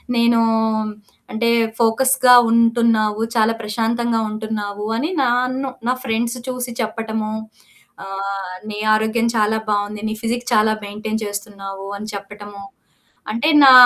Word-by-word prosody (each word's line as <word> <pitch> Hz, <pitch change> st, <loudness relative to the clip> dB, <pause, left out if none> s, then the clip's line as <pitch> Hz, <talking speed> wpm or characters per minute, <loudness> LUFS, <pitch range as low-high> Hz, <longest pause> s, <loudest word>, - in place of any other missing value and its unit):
నేను 235 Hz, 0 st, +4 dB, 0.9 s
అంటే 230 Hz, +1 st, 0 dB, 0.3 s
ఫోకస్‌గా 255 Hz, +2 st, +4 dB, 0.2 s
ఉంటున్నావు, 230 Hz, -2 st, +3 dB
చాలా 225 Hz, 0 st, +3 dB
ప్రశాంతంగా 230 Hz, +2 st, 0 dB
ఉంటున్నావు 210 Hz, -1 st, -4 dB
అని 300 Hz, +8 st, -1 dB
నన్ను 255 Hz, +2 st, 0 dB, 0.2 s
నా 250 Hz, -, +3 dB
ఫ్రెండ్స్ 235 Hz, +1 st, -1 dB
చూసి 250 Hz, -1 st, -3 dB
చెప్పటము, 220 Hz, -1 st, -3 dB, 0.7 s
ఆహ్, 195 Hz, -1 st, -5 dB
"నీ 210 Hz, -, -5 dB, 0.2 s
ఆరోగ్యం 220 Hz, +2 st, +1 dB
చాలా 215 Hz, 0 st, +2 dB
బావుంది. 205 Hz, 0 st, -1 dB
నీ -, -, -2 dB
ఫిజిక్ 240 Hz, +1 st, -2 dB
చాలా 215 Hz, 0 st, +4 dB
మెయింటైన్ 215 Hz, +2 st, -4 dB
చేస్తున్నావు" 200 Hz, -1 st, -6 dB
అని 215 Hz, +1 st, -7 dB
చెప్పటము. 205 Hz, 0 st, -9 dB, 0.7 s
అంటే 235 Hz, +8 st, +1 dB
నా 270 Hz, -, +10 dB
220 Hz, 115 wpm, -20 LUFS, 210-235 Hz, 0.9 s, నా